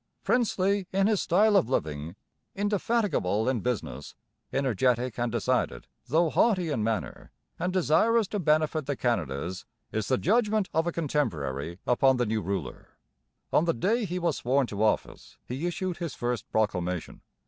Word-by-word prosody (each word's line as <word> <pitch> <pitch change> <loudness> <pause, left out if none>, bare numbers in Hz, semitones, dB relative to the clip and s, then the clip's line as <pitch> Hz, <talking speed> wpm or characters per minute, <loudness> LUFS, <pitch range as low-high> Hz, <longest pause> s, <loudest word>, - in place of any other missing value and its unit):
'Princely 200 -5 +1
in 195 +1 +2
his 210 -2 +2
style 205 +5 +3
of 125 - +3
living, 75 - -2 0.4
indefatigable 200 - 0
in 130 -2 +1
business, 125 +1 -4 0.4
energetic 125 -2 +1
and 120 -1 0
decided, 120 - 0 0.2
though 160 +4 +2
haughty 185 -8 +2
in 115 -7 -1
manner, 110 -3 -3 0.3
and 180 +1 -1
desirous 195 +5 +3
to 205 - -3
benefit 155 -2 +1
the 145 - -1
Canadas,' 90 - -2 0.3
is 110 -2 -2
the 130 - +2
judgment 215 - +2
of 160 +2 +1
a - - +1
contemporary 85 - -2
upon 130 +1 +3
the 120 - +1
new 110 0 -1
ruler. 95 -8 -5 0.6
On 160 - +4
the 165 - +1
day 220 - +1
he 180 -1 -3
was 170 -4 0
sworn 130 +3 +1
to 105 -3 -5
office 110 - -1
he 135 +8 -3
issued 185 0 -3
his 170 -6 -4
first 120 -2 -3
proclamation. 90 -5 -1
135 Hz, 155 wpm, -28 LUFS, 110-185 Hz, 0.6 s, On